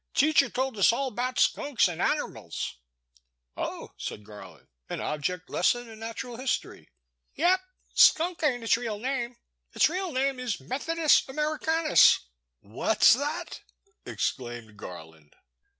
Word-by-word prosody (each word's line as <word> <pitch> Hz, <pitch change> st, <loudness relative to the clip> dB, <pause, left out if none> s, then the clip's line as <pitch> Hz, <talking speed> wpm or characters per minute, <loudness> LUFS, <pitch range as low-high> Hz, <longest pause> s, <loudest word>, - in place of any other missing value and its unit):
Teacher 285 Hz, -2 st, +4 dB
told 260 Hz, 0 st, -2 dB
us 195 Hz, -, +6 dB
all 265 Hz, +3 st, -1 dB
about 250 Hz, +2 st, -3 dB
skunks 275 Hz, -8 st, +2 dB
an* 175 Hz, -3 st, -6 dB
anermals. -, -, -2 dB, 0.8 s
Oh,'* -, -, -5 dB
said 105 Hz, -, -6 dB
Garland, 105 Hz, 0 st, -13 dB, 0.2 s
an -, -, -4 dB
object 165 Hz, +4 st, -3 dB
lesson 240 Hz, +6 st, +1 dB
in 220 Hz, -1 st, -12 dB
nat 225 Hz, 0 st, -5 dB
ural 240 Hz, -2 st, -9 dB
history? 255 Hz, 0 st, -3 dB, 0.5 s
Yep. 360 Hz, +4 st, +3 dB, 0.3 s
Skunk 335 Hz, +1 st, +4 dB
ain*t 255 Hz, -6 st, +1 dB
its 225 Hz, -, +3 dB
real 230 Hz, -3 st, -4 dB
name, 245 Hz, +1 st, -3 dB, 0.4 s
its -, -, +4 dB
real 365 Hz, +1 st, -3 dB
name 270 Hz, -1 st, 0 dB
is 245 Hz, -5 st, -3 dB
Methodist 300 Hz, -, +1 dB
Americanus 310 Hz, +2 st, +3 dB, 0.4 s
What 120 Hz, -, -2 dB
*s -, -, +9 dB
that? 295 Hz, +7 st, -3 dB, 0.4 s
exclaimed 120 Hz, -4 st, -4 dB
Garland. 80 Hz, -6 st, -11 dB
250 Hz, 135 wpm, -27 LUFS, 180-300 Hz, 0.8 s, s